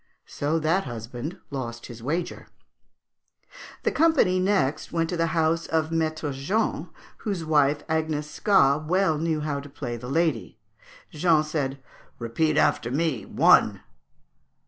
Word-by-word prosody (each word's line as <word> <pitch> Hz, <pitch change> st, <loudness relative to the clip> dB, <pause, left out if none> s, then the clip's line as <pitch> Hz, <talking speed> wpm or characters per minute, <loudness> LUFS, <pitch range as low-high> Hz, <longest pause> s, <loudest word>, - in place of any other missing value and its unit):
So 150 Hz, +3 st, -1 dB
that 165 Hz, +5 st, +1 dB
husband 120 Hz, +6 st, -6 dB
lost 120 Hz, -4 st, -5 dB
his 120 Hz, -2 st, -10 dB
wager. 165 Hz, +8 st, -3 dB, 1.4 s
"The -, -, +1 dB
company 295 Hz, -, +3 dB
next 185 Hz, -7 st, 0 dB
went 165 Hz, -1 st, 0 dB
to -, -, -1 dB
the 165 Hz, 0 st, +1 dB
house 165 Hz, +1 st, +1 dB
of 160 Hz, 0 st, 0 dB
Maître 155 Hz, -2 st, -1 dB
Jean, 185 Hz, +12 st, -1 dB, 0.3 s
whose 195 Hz, -7 st, -3 dB
wife, 145 Hz, -2 st, +2 dB
Agnescat 155 Hz, 0 st, +1 dB
well 175 Hz, -3 st, +2 dB
knew 160 Hz, -1 st, -1 dB
how 150 Hz, -2 st, -2 dB
to 140 Hz, +1 st, -10 dB
play 120 Hz, -4 st, -5 dB
the 125 Hz, +2 st, -8 dB
lady. 155 Hz, -8 st, 0 dB, 0.5 s
Jean 155 Hz, 0 st, +3 dB
said, 140 Hz, -3 st, -3 dB, 0.4 s
'Repeat 150 Hz, +7 st, 0 dB
after 120 Hz, -6 st, +2 dB
me, 140 Hz, -3 st, -1 dB
one!' -, -, +4 dB
155 Hz, 130 wpm, -25 LUFS, 135-165 Hz, 1.4 s, one